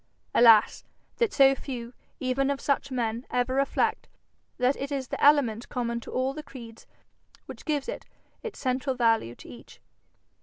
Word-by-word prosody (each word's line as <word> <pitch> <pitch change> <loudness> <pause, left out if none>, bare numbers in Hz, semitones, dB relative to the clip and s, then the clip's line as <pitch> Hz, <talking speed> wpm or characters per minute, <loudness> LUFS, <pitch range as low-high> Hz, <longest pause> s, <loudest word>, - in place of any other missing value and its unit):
Alas! 225 -3 +5 0.3
that 465 -3 +1
so 270 -1 +5
few, 250 -3 -7 0.3
even 265 +1 0
of 280 -1 -1
such 280 0 -1
men, 235 -2 -2
ever 250 +1 0
reflect, 275 +1 0 0.5
that 250 +2 +2
it 275 +1 -5
is 270 -3 -3
the - - -4
element 255 -6 +3
common 235 -2 -2
to - - -11
all 260 +1 -1
the 305 - -6
creeds 240 -6 -12 0.6
which - - -11
gives 295 -3 -1
its 455 -3 -9
central 255 +1 -1
value 225 - +1
to - - -14
each. 120 - -13
255 Hz, 155 wpm, -27 LUFS, 235-275 Hz, 0.6 s, Alas